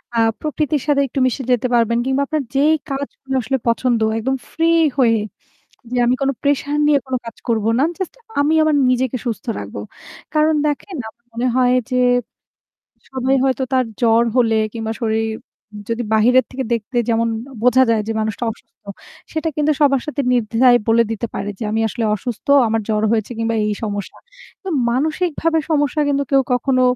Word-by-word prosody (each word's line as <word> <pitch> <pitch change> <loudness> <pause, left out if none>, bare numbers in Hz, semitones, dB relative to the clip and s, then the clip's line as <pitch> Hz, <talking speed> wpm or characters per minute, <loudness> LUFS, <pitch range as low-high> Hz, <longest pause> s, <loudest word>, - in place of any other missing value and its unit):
আ - - 0 0.2
প্রকৃতির 300 -2 -1
সাথে 280 -1 +3
একটু 270 - -4
মিশে 255 +1 -1
যেতে 250 +1 +2
পারবেন 235 -1 +2
কিংবা 265 +1 +1
আপনার 310 -2 -1
যেই 295 +3 +4 0.2
কাজগুলো 275 -1 -5
আসলে 265 +3 -1
পছন্দ 235 0 +1 0.2
একদম 265 +4 -1 0.2
ফ্রি 330 0 +1 0.3
হয়ে, 230 -4 +3 0.7
যে 250 - 0
আমি 245 - +3
কোনো 275 0 +1
প্রেশার 285 +1 0
নিয়ে 295 -1 +4
কোনো 260 - -1
কাজ 230 -1 -9
করবো 220 -1 +1
না। - - +3
জাস্ট 375 -3 -5 0.3
আমি 300 +3 +2
আমার 310 -2 +2
নিজেকে 255 0 0
সুস্থ 230 - -3
রাখবো। 100 0 -7 0.5
কারণ 310 +1 +3
দেখেন 300 +5 -3
আমার 235 +2 -18
মনে 235 +2 -2
হয় 250 -1 +3 0.2
যে 255 - 0 1.1
সবাই 260 0 0
হয়তো 265 0 +1
তার 255 -1 +3 0.2
জ্বর 230 0 +4
হলে 230 -3 +3 0.2
কিংবা 225 -1 -4
শরীর 225 0 0 0.6
যদি 230 +1 -1
বাহিরের 245 +4 +4
থেকে 265 +1 -3
দেখতে 230 +2 -3
যেমন 230 0 +2 0.2
অ - - -12
বোঝা 250 +1 +5
যায় 225 -2 +2
যে - - -1
মানুষটা 220 +2 -2
অসুস্থ। - - -20 0.5
সেটা 320 0 -1
কিন্তু 300 0 +2
সবার 275 -3 +4
সাথে 300 -1 -2
নির্দ্বিধায় 245 +1 +4
বলে 230 +1 +4
দিতে 225 +1 -3
পারে 205 - -4
যে - - -3
"আমি 220 +1 0
আসলে 230 +2 -4
অসুস্থ 235 +4 -6 0.2
আমার 225 0 0
জ্বর 215 0 +1
হয়েছে 220 0 0
কিংবা 230 0 -1
এই 210 - 0
সমস্যা।" 205 -2 -4 0.7
মানসিকভাবে 320 +4 0
সমস্যা 295 -1 +1
কিন্তু 280 0 +1
কেউ 275 -1 +5
কখনো 255 +1 +1
255 Hz, 175 wpm, -19 LUFS, 230-280 Hz, 1.1 s, বোঝা